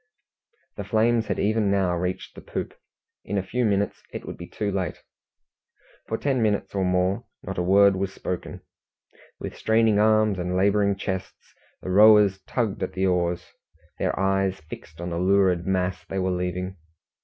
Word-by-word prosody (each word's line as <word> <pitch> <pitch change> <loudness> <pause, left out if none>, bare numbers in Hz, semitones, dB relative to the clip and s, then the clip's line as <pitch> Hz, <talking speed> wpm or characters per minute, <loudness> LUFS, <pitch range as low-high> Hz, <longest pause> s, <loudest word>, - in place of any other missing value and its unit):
The 100 - -4
flames 115 +2 +2
had - - -1
even 105 0 +1
now 95 -3 +1
reached 90 +1 -3
the - - -11
poop; - - -5 0.5
in 100 - -3
a 95 - 0
few 125 +6 -1
minutes 100 -2 0
it - - -7
would - - -6
be 85 - -9
too 105 -1 -3
late. 95 -4 -3 1.0
For 110 - -2
ten 135 -2 0
minutes 105 -2 0
or 95 -1 0
more 90 +1 +1 0.2
not - - -4
a - - +2
word 100 +2 +5
was 95 0 -2
spoken. 90 -2 -5 0.8
With - - -6
straining 110 -1 +2
arms 110 -2 +3
and 90 +1 -1
labouring 100 +1 +3
chests, 95 -1 -6 0.3
the 95 - -3
rowers 105 -1 +6
tugged 115 -6 -1
at 95 - -3
the 95 0 0
oars, 90 -1 0 0.5
their - - -1
eyes 95 -1 +1
fixed 80 0 -11
on 85 0 -4
the 85 - -2
lurid 95 -2 +2
mass 90 -1 -1
they 95 - -6
were 95 0 0
leaving. 90 +1 -3
95 Hz, 170 wpm, -25 LUFS, 90-105 Hz, 1.0 s, rowers